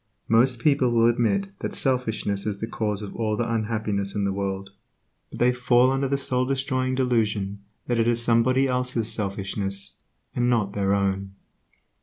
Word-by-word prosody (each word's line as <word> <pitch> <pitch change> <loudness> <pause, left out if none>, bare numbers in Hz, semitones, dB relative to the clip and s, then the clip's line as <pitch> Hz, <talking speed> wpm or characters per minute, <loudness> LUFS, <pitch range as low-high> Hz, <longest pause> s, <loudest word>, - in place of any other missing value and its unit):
Most 120 +3 +4
people 140 -1 +3
will 115 -1 +3
admit 100 -5 +1
that - - -4
selfishness 110 -6 -1
is 100 -2 -2
the - - -2
cause 105 -2 -3
of 100 - -8
all 110 -2 -1
the 120 - -1
unhappiness 110 -3 -2
in 105 - 0
the 100 -1 0
world, 95 0 -4 0.6
but - - -9
they 125 +1 +3
fall 125 +1 +3
under 135 +1 0
the 140 +1 0
soul 130 -2 0
destroying 130 -1 -1
delusion 110 -6 0 0.3
that 120 -1 0
it 115 - +2
is 120 0 +3
somebody 120 +3 +3
else's 125 -3 0
selfishness, 100 -1 -3 0.4
and 120 0 +1
not 105 -5 +1
their 100 -1 +1
own. 95 -1 -1
115 Hz, 170 wpm, -24 LUFS, 100-125 Hz, 0.6 s, Most